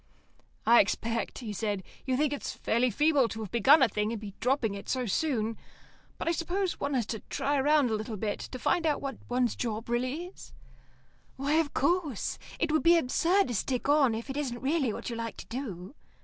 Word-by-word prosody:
"I 235 Hz, +1 st, +7 dB
expect," 230 Hz, +3 st, 0 dB
he 225 Hz, -5 st, -5 dB
said, 205 Hz, -2 st, -2 dB, 0.2 s
"you 255 Hz, -1 st, +1 dB
think 295 Hz, 0 st, +1 dB
it's 285 Hz, -, -4 dB
fairly 245 Hz, +2 st, +1 dB
feeble 295 Hz, -1 st, +3 dB
to 225 Hz, 0 st, -6 dB
have 210 Hz, -, -6 dB
begun 265 Hz, +6 st, +6 dB
a -, -, +6 dB
thing 210 Hz, +1 st, -1 dB
and 230 Hz, -, -3 dB
be 205 Hz, -2 st, -8 dB
dropping 250 Hz, -4 st, +1 dB
it 200 Hz, -, -8 dB
so 255 Hz, -1 st, 0 dB
soon. 225 Hz, -2 st, 0 dB, 0.6 s
But -, -, -5 dB
I -, -, +4 dB
suppose 355 Hz, +3 st, -1 dB
one 280 Hz, 0 st, -1 dB
has 240 Hz, -4 st, +1 dB
to 220 Hz, +1 st, -4 dB
try 285 Hz, 0 st, 0 dB
round 290 Hz, -3 st, +3 dB
a -, -, +1 dB
little, 215 Hz, 0 st, -3 dB
to 215 Hz, +5 st, -4 dB
find 335 Hz, +5 st, +1 dB
out 295 Hz, -, +1 dB
what 275 Hz, -1 st, -5 dB
one's 245 Hz, -1 st, +1 dB
job 225 Hz, -1 st, -3 dB
really 255 Hz, +8 st, -1 dB
is." 365 Hz, -, -13 dB, 0.8 s
"Why, 280 Hz, +3 st, -1 dB
of 305 Hz, -3 st, -1 dB
course. 300 Hz, -, 0 dB, 0.2 s
It 325 Hz, -, +1 dB
would 315 Hz, -, +3 dB
be 340 Hz, +1 st, +6 dB
absurd 335 Hz, +5 st, +2 dB
to -, -, -2 dB
stick 250 Hz, +5 st, -1 dB
on 280 Hz, -6 st, +4 dB
if 230 Hz, +3 st, -5 dB
it 270 Hz, 0 st, -5 dB
isn't 255 Hz, -5 st, -2 dB
really 275 Hz, -2 st, +1 dB
what 225 Hz, -, -5 dB
you -, -, -3 dB
like 230 Hz, 0 st, -5 dB
to -, -, -8 dB
do." 225 Hz, -5 st, -6 dB
255 Hz, 210 wpm, -29 LUFS, 225-295 Hz, 0.8 s, I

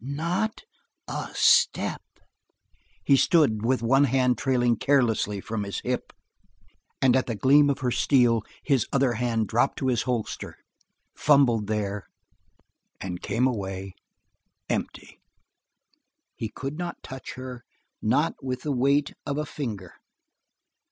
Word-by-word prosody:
"Not 170 Hz, -, -2 dB, 0.4 s
a -, -, -4 dB
step!" 470 Hz, +1 st, +3 dB, 1.0 s
He 140 Hz, -, +5 dB
stood 135 Hz, -8 st, +3 dB
with 125 Hz, 0 st, +1 dB
one 135 Hz, +4 st, +4 dB
hand 130 Hz, -1 st, +2 dB
trailing 120 Hz, -1 st, +1 dB
carelessly 115 Hz, -7 st, +1 dB
from 110 Hz, +1 st, -4 dB
his 100 Hz, -1 st, -4 dB
hip, 125 Hz, 0 st, -3 dB, 0.9 s
and 130 Hz, -2 st, +5 dB
at 130 Hz, -, +1 dB
the 115 Hz, -, -2 dB
gleam 145 Hz, +6 st, +5 dB
of 140 Hz, 0 st, -1 dB
her 125 Hz, -1 st, 0 dB
steel 120 Hz, -4 st, +3 dB, 0.2 s
his 135 Hz, -6 st, +1 dB
other 135 Hz, -3 st, +2 dB
hand 115 Hz, -2 st, -1 dB
dropped 115 Hz, +7 st, +1 dB
to 130 Hz, -1 st, 0 dB
a -, -, +2 dB
holster, 120 Hz, -2 st, -3 dB, 0.6 s
fumbled 130 Hz, -8 st, +3 dB
there, 105 Hz, -2 st, -3 dB, 0.9 s
and 90 Hz, -2 st, -5 dB
came 115 Hz, +5 st, 0 dB
away 95 Hz, -6 st, -3 dB, 0.8 s
empty; -, -, -4 dB, 1.2 s
he 110 Hz, -, -4 dB
could 140 Hz, -, -6 dB
not 175 Hz, -1 st, -5 dB
touch 130 Hz, -2 st, -8 dB
her, 130 Hz, -2 st, -8 dB, 0.4 s
not -, -, +2 dB
with 130 Hz, -1 st, -4 dB
the 150 Hz, -, -1 dB
weight 140 Hz, +2 st, +2 dB
of 140 Hz, 0 st, -2 dB
a 150 Hz, -, -1 dB
finger. 105 Hz, -, -6 dB
125 Hz, 130 wpm, -26 LUFS, 110-140 Hz, 1.2 s, He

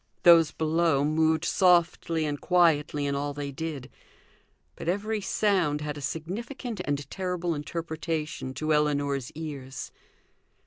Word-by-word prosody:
Those 165 Hz, -2 st, +7 dB
below 160 Hz, -2 st, +1 dB
moved 160 Hz, +1 st, +2 dB
softly 170 Hz, -3 st, +3 dB
and 145 Hz, -1 st, -3 dB
quietly 155 Hz, -5 st, +3 dB
in 140 Hz, -, 0 dB
all 145 Hz, 0 st, -2 dB
they 145 Hz, -1 st, -4 dB
did; 140 Hz, -2 st, -5 dB, 0.9 s
but -, -, -4 dB
every 210 Hz, +3 st, -1 dB
sound 185 Hz, -8 st, +1 dB
had 150 Hz, -1 st, -3 dB
a 145 Hz, -, -7 dB
significant 205 Hz, -, -4 dB
and 145 Hz, 0 st, -2 dB
terrible 180 Hz, -2 st, -2 dB
interpretation 155 Hz, -2 st, -4 dB
to 155 Hz, +3 st, 0 dB
Ellinor's 145 Hz, -3 st, 0 dB
ears. 145 Hz, -4 st, -6 dB
155 Hz, 125 wpm, -27 LUFS, 145-170 Hz, 0.9 s, Those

